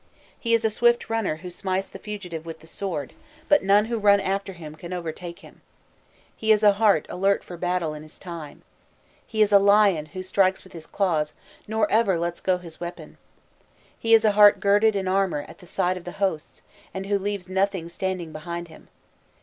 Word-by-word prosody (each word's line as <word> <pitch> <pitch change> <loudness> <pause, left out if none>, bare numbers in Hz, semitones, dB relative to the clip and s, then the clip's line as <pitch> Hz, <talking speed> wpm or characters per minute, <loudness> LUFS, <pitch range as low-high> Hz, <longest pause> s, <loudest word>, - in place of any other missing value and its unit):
He 230 -1 +2
is 230 0 0
a 220 - +2
swift 240 +1 +2
runner 225 -8 0
who 180 +3 -9
smites 190 +1 -2
the - - -11
fugitive 185 -6 -6
with 165 -1 -9
the - - -16
sword, 165 -5 -5 0.3
but 295 0 +4
none 200 +2 +4
who 230 0 -2
run 200 -1 +5
after 195 0 -2
him 160 -4 -10
can 170 +3 -8
overtake 170 0 -6
him. - - -16 0.7
He 220 0 +1
is 215 0 +4
a 205 - +8
heart 200 -6 +3
alert 195 +2 +1
for 175 - -9
battle 175 -2 -1
in 150 - -8
his 155 0 -10
time. 170 -5 -9 0.6
He 220 -1 +2
is 210 - 0
a 200 - +8
lion 200 -6 +4
who 185 +5 -7
strikes 190 0 +1
with 185 - -17
his 165 -2 -10
claws, 160 -7 0 0.3
nor 220 0 +1
ever 210 -5 +3
lets 170 +1 -3
go 185 -1 +1
his 170 -3 -11
weapon. 175 0 -8 0.8
He 225 0 +5
is 225 0 +3
a 215 - +5
heart 205 -1 +6
girded 205 +2 +3
in 190 -1 -1
armour 185 -5 0
at - - -14
the 180 - -14
sight 180 +2 0
of 180 - -9
the 175 - -7
hosts, 190 -6 -3 0.3
and 190 0 -4
who 200 0 0
leaves 200 -1 -4
nothing 190 -2 -1
standing 175 -1 -4
behind 170 +2 -6
him. 160 - -16
190 Hz, 205 wpm, -24 LUFS, 170-205 Hz, 0.8 s, a